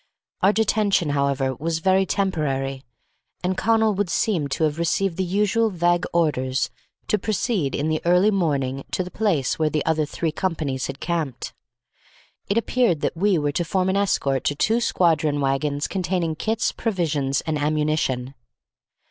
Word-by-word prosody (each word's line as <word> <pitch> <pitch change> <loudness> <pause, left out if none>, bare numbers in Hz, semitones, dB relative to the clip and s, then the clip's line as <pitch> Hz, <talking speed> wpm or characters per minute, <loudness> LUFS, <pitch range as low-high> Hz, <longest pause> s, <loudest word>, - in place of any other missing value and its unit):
Our 195 - +5
detention, 205 -6 +1
however, 140 -2 0
was 160 +5 -2
very 190 +3 +2
temporary, 135 -9 -1 0.6
and 185 +1 0
Connal 220 +1 +2
would 200 -2 -1
seem 170 -4 0
to 140 +3 -2
have 155 0 0
received 170 +2 0
the 190 - -1
usual 210 +5 +1
vague 175 -2 +1
orders 135 -6 0 0.4
to 210 - +1
proceed 205 - -1
in 145 - -1
the 155 0 0
early 180 +5 +4
morning 140 -8 0
to 185 - 0
the 180 - -9
place 170 -13 0
where 155 -1 +2
the 150 -1 -1
other 155 -2 +1
three 160 +1 -2
companies 155 -7 -2
had 135 +1 -7
camped. 160 -7 -3 1.0
It 200 - +1
appeared 230 -8 +1
that - - -1
we 195 +2 +2
were 145 -1 0
to 175 - -1
form 185 +2 0
an 190 - +1
escort 140 -9 +1
to 145 - +1
two 225 +10 +1
squadron 155 -8 +2
wagons 140 +1 0
containing 180 -3 -1
kits, 220 +8 -1
provisions, 155 - -1
and 155 -2 -2
ammunition. 150 -4 0
165 Hz, 160 wpm, -23 LUFS, 145-195 Hz, 1.0 s, Our